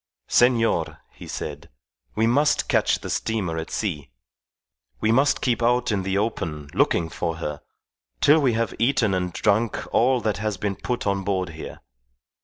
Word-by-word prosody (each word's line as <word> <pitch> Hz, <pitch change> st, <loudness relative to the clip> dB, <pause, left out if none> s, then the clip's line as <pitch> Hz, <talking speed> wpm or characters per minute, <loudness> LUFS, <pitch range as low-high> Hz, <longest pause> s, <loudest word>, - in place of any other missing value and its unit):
"Senor," 120 Hz, -2 st, +2 dB
he -, -, -12 dB
said, 75 Hz, +2 st, -6 dB, 0.5 s
"we 110 Hz, -, +2 dB
must 145 Hz, +6 st, +2 dB
catch -, -, +2 dB
the -, -, -6 dB
steamer 95 Hz, -8 st, -1 dB
at 80 Hz, -, -6 dB
sea. 80 Hz, -, -3 dB, 0.9 s
We 110 Hz, -, +2 dB
must 135 Hz, +5 st, +3 dB
keep 120 Hz, -2 st, 0 dB
out 120 Hz, 0 st, +2 dB
in 100 Hz, -2 st, 0 dB
the 95 Hz, +1 st, -1 dB
open 80 Hz, -9 st, -3 dB
looking 85 Hz, -1 st, +2 dB
for 80 Hz, 0 st, -3 dB
her 75 Hz, -3 st, -5 dB, 0.6 s
till 150 Hz, -, +5 dB
we 130 Hz, -5 st, +2 dB
have 115 Hz, 0 st, -1 dB
eaten 115 Hz, -4 st, +2 dB
and 90 Hz, -1 st, -1 dB
drunk 110 Hz, +5 st, +1 dB, 0.2 s
all 125 Hz, +2 st, +3 dB
that 110 Hz, -2 st, -1 dB
has 105 Hz, -1 st, -2 dB
been 100 Hz, 0 st, -2 dB
put 120 Hz, +5 st, -3 dB
on 100 Hz, -1 st, 0 dB
board 95 Hz, -2 st, -1 dB
here. 80 Hz, -1 st, -9 dB
105 Hz, 165 wpm, -24 LUFS, 90-120 Hz, 0.9 s, till